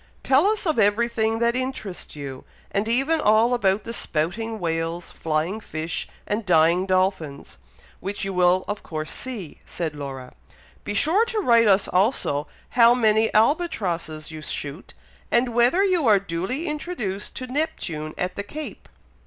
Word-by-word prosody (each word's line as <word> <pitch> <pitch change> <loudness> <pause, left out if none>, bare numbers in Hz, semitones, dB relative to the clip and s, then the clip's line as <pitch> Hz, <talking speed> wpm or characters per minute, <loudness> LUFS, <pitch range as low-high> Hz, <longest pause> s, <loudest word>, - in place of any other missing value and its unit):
"Tell 275 +8 +4
us 430 -1 0
of 315 -8 +1
every 210 +3 +3
thing 225 -1 0
that 235 +1 +1
interests 255 -11 -4
you, 140 -3 -7 0.3
and 200 +2 0
even 275 +7 +2
all 220 +2 +4
about 200 -4 +2
the 230 - -6
spouting 220 +7 -2
whales, 165 0 -2
flying 160 +6 -1
fish, 160 -5 -4 0.2
and 210 +2 -2
dying 175 +1 +3
dolphins, 185 - -1 0.4
which 195 +1 -4
you 195 - -3
will 180 0 +3
of 205 0 -3
course 155 -1 -5
see," 225 - -6
said 165 -3 -4
Laura. 135 -3 -7 0.5
"Be 205 - -4
sure 335 - +4
to 465 -1 -4
write 235 - +5
us 195 -1 +4
also, 180 - +1 0.2
how 240 0 +6
many 220 -2 +3
albatrosses 190 - 0
you 155 -1 -8
shoot, 150 +2 -5 0.3
and 240 0 +2
whether 245 +11 +4
you 360 -8 +2
are 210 -2 +7
duly 195 - -3
introduced 295 - -4
to 255 - -5
Neptune 250 - -3
at 180 0 -2
the - - -3
Cape." 285 +1 -8
205 Hz, 155 wpm, -24 LUFS, 170-245 Hz, 0.5 s, are